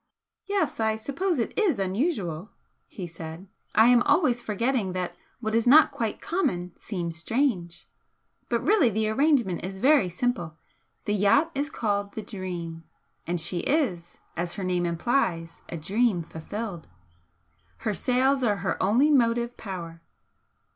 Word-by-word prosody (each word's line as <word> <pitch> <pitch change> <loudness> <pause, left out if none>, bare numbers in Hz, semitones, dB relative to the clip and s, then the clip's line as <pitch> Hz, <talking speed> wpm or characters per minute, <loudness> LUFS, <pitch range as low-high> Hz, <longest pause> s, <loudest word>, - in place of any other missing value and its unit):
"Yes, 390 - 0
I 220 -1 +2
suppose 300 - -2
it 230 - -2
is 395 - +2
unusual," 195 - -1 0.4
he 185 - -7
said 165 +1 -8 0.3
"I 220 - +7
am 245 -1 +6
always 245 -5 +3
forgetting 220 -2 -1
that 180 -1 -3 0.3
what 220 -1 -2
is 230 +1 +2
not 300 +4 +7
quite 225 -3 -3
common 180 - -1
seems 170 -5 -5
strange! 180 - -1 0.6
But - - 0
really 400 - +4
the 215 0 0
arrangement 245 - +2
is 190 +1 -5
very 260 -4 +4
simple. 175 -5 -2 0.5
The 205 - 0
yacht 210 - +3
is 285 +1 -2
called 205 -7 -2
the 220 - -4
'Dream' 175 -5 -6 0.4
and 175 0 -1
she 175 +2 -1
is, 185 - -1 0.2
as 175 0 -2
her 195 - -4
name 180 -1 0
implies, 170 -2 -1
a 170 - -4
'dream' 195 +3 +1
fulfilled. 175 +3 -6 1.0
Her 215 - +1
sails 260 +7 +2
are 210 -4 +2
her - - -1
only 240 +10 +4
motive 240 -2 +2
power. 170 -5 -7
210 Hz, 145 wpm, -26 LUFS, 175-250 Hz, 1.0 s, I